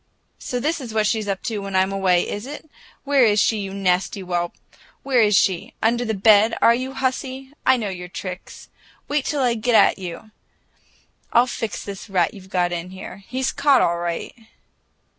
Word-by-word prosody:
"So 250 - -3
this 310 +5 -1
is 230 -4 -7
what 215 -1 +2
she's 215 -1 0
up 195 -1 -3
to 220 -3 -2
when 195 -1 -5
I'm 190 +1 +3
away, 185 -3 +2
is 205 +5 -5
it? 295 +2 -8 0.4
Where 280 -2 +3
is 210 -2 +4
she, 220 +1 +2
you 195 -1 -4
nasty 190 -2 0
whelp, 175 -2 -2 0.5
where 260 -3 +3
is 210 -3 +4
she? 185 -3 0
Under 235 +2 +1
the 220 -2 -2
bed, 215 +2 +5
are 230 - +6
you, 260 +2 -3
hussy? 265 +1 -3
I 260 0 +6
know 215 -4 -3
your 180 -1 -6
tricks! 180 +1 -8 0.4
Wait 290 -1 0
till 290 -3 0
I 245 -2 +3
get 235 +1 0
at - - +5
you! 185 +4 -8 1.0
I'll 240 +1 +5
fix 230 -3 -5
this 200 +1 -8
rat 180 -4 +1
you've 190 -2 -13
got 180 -2 0
in 175 +1 -4
here. 185 0 -9
He's 260 +1 -1
caught, 280 -1 +4
all 170 0 +1
right!" 170 -1 -4
210 Hz, 195 wpm, -22 LUFS, 185-245 Hz, 1.0 s, are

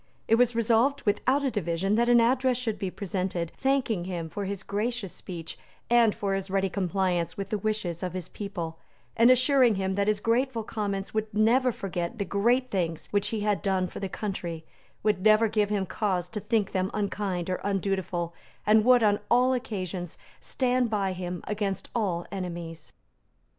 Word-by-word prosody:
It - - +2
was 240 0 +4
resolved 235 +5 +2
without 260 +7 +1
a 270 - +1
division 190 -1 -1
that 235 +2 +3
an 240 0 +7
address 255 +1 +3
should 230 -4 -3
be 190 - -2
presented, 185 -3 -3
thanking 255 -9 0
him 170 -3 -4
for 205 -1 -4
his 195 0 -4
gracious 210 0 -2
speech 170 -3 -8 0.3
and 235 -3 +5
for 200 -1 -1
his 195 0 -3
ready 195 0 +1
compliance 185 -2 0
with 195 -1 -4
the 215 - 0
wishes 200 -5 -2
of 180 -2 -3
his 185 -3 -4
people, 175 -6 -6 0.4
and 230 +2 +6
assuring 255 -2 +5
him 190 0 -1
that 200 +1 0
his 215 -1 +2
grateful 230 +2 +1
Commons 200 -3 -3
would 215 0 -1
never 245 +4 +4
forget 180 -1 -4
the 200 - -1
great 240 +7 +1
things 170 -4 -2
which 205 -1 +1
he 220 -2 -2
had 210 -1 +1
done 190 -2 +1
for - - -7
the 195 - -3
country, 175 -6 -4 0.4
would 210 -3 +2
never 215 +2 +5
give 210 -1 +1
him 205 -2 0
cause 185 -2 -1
to 220 - -4
think 210 -1 0
them 185 0 0
unkind 195 -4 -2
or 185 - -2
undutiful, 190 -3 -1 0.3
and 215 0 +5
would, 250 0 +5
on 205 -1 +3
all 250 +2 +4
occasions, 185 -8 -4 0.2
stand 250 -2 0
by 200 -3 0
him 180 -1 -5
against 205 -2 -3
all 185 -7 -1
enemies. 175 -4 -6
205 Hz, 180 wpm, -27 LUFS, 185-230 Hz, 0.4 s, an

